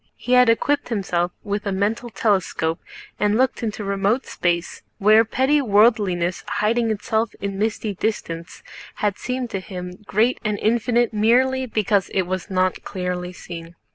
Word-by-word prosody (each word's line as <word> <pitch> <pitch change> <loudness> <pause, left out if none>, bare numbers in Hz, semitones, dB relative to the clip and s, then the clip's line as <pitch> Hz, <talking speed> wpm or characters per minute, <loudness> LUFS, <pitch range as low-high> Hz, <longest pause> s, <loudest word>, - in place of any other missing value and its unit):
He 245 - -6
had 250 -1 +6
equipped 285 +5 +1
himself 180 -5 -1
with 205 0 -3
a - - 0
mental 210 +5 -1
telescope 190 -7 0 0.4
and 210 +1 +2
looked 260 +1 +1
into 215 -2 -3
remote 200 +5 0
space, 170 -1 -2 0.2
where 215 +2 +6
petty 265 +6 +2
worldliness 205 -6 +2
hiding 225 +3 +1
itself 220 +1 -1
in 195 0 -4
misty 215 0 -1
distance 170 -5 -4 0.3
had 205 -2 -1
seemed 250 -1 -3
to 195 - -2
him 180 -1 -7
great 225 +5 +2
and 210 -2 -1
infinite 235 +2 +1
merely 255 +5 +3
because 210 -3 +1
it 190 - +3
was 185 +2 -4
not 185 -1 0
clearly 180 -1 -4
seen. 170 -1 -9
210 Hz, 150 wpm, -22 LUFS, 185-230 Hz, 0.4 s, had